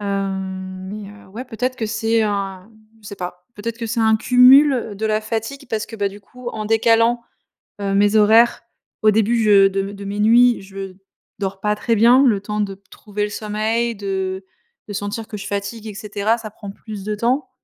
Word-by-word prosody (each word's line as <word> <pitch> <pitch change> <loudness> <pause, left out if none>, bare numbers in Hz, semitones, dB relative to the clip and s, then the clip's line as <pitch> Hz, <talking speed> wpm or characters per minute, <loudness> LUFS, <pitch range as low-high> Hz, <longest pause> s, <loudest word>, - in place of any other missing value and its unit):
Hem, 190 -2 -4
mais 205 -1 -7 0.2
ouais, 230 +7 -7
peut-être 255 +2 -3
que 220 - -2
c'est 225 +1 +1
un 200 -1 -3 0.3
je - - -13
sais 200 - -8
pas. 180 0 -7
Peut-être 230 +3 -5
que 230 - -4
c'est 230 +1 -1
un 220 0 +4
cumul, 260 +5 +6
heu, 225 -5 -3
de 220 +2 -2
la 215 0 +1
fatigue 225 +6 -4
parce 215 -1 -2
que, 225 - -9
bah, 200 -1 0
du 200 +1 -12
coup, 250 +4 -10
en 215 -2 -5
décalant, 230 +2 +3 0.6
heu, 195 0 -1
mes 205 +2 +3
horaires, 225 +3 +5 0.4
au 215 0 +5
début 225 +2 +2
je 200 -2 +6
de 195 0 -1
m 200 +1 -5
de 200 0 -9
mes 205 +1 -4
nuits, 235 +2 +5
je 195 -1 -8 0.4
dors 195 -1 -3
pas 210 0 +1
très 230 +2 0
bien. 240 +5 +6
Le 210 -6 +2
temps 210 +1 -3
de 195 -1 -3 0.2
trouver 210 -1 -5
le 210 - -1
sommeil, 220 +3 -1
de 190 -1 -3 0.4
de - - -5
sentir 205 +3 -4
que 210 - -6
je 195 - -7
fatigue, 205 +2 -4
et 210 - -6
cetera, 210 +2 -1
ça 215 -2 -8
prend 205 -2 -10
plus 210 -1 -9
de 210 0 -2
temps. 255 +5 0
210 Hz, 210 wpm, -20 LUFS, 200-230 Hz, 0.6 s, cumul